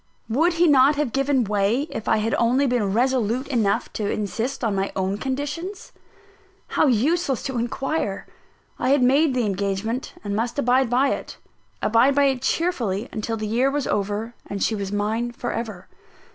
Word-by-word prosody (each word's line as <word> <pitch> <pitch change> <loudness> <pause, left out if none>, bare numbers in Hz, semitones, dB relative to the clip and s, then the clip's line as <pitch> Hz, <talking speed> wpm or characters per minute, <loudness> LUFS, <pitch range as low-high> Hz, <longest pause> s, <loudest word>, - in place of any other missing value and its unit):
Would 320 +10 +2
he 340 +1 +3
not 285 -1 +5
have 290 -4 -1
given 275 0 +1
way, 210 +4 +1
if 220 - -6
I 220 - +3
had 220 +1 -1
only 250 +4 +3
been 240 -6 +1
resolute 245 +2 +1
enough 220 -7 0
to 210 -2 -2
insist 225 +6 -3
on 220 -3 +1
my 195 0 -1
own 190 +1 -1
conditions? 290 +9 -4 0.8
How 315 - +2
useless 270 +3 +1
to 265 -3 -2
inquire! 240 -3 -2 0.5
I 255 - 0
had 275 -1 +4
made 275 +2 +3
the 245 -3 +1
engagement 200 +5 -2
and 200 -1 -3
must 235 +5 -2
abide 255 -2 +2
by 260 +3 +3
it - - -4 0.5
abide 235 +5 +4
by 285 - +4
it 265 -3 +1
cheerfully 240 - -1
until 225 +1 -3
the 215 - -4
year 240 +5 +2
was 285 0 -1
over, 210 +3 -2
and 200 -1 -3
she - - +1
was 200 -2 -3
mine 220 +4 -1
for 240 0 -4
ever. 215 -6 -5
240 Hz, 175 wpm, -23 LUFS, 210-270 Hz, 0.8 s, not